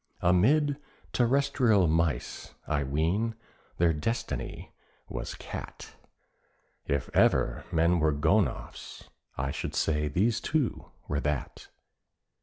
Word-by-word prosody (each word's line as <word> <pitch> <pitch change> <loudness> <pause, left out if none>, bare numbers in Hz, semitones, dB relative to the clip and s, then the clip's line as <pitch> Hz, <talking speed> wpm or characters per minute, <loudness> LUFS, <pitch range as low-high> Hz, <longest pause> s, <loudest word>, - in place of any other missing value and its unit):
Amid 135 - +3 0.4
terrestrial 125 -5 +3
mice, 80 -4 -1
I 75 -2 0
ween, 85 +12 0 0.4
their 85 -1 +3
destiny 115 +11 -3 0.4
was - - -5
Cat; - - -8 0.9
If 70 -2 0
ever - - +3
men 85 +2 +3
were 80 0 +3
gonoffs, 80 +2 -1 0.3
I 65 +1 -1
should - - -4
say 75 -1 +1
these 110 +9 +1
two 150 -6 -1 0.2
were 75 - -1
that. 75 -2 -3
85 Hz, 100 wpm, -29 LUFS, 75-115 Hz, 0.9 s, Amid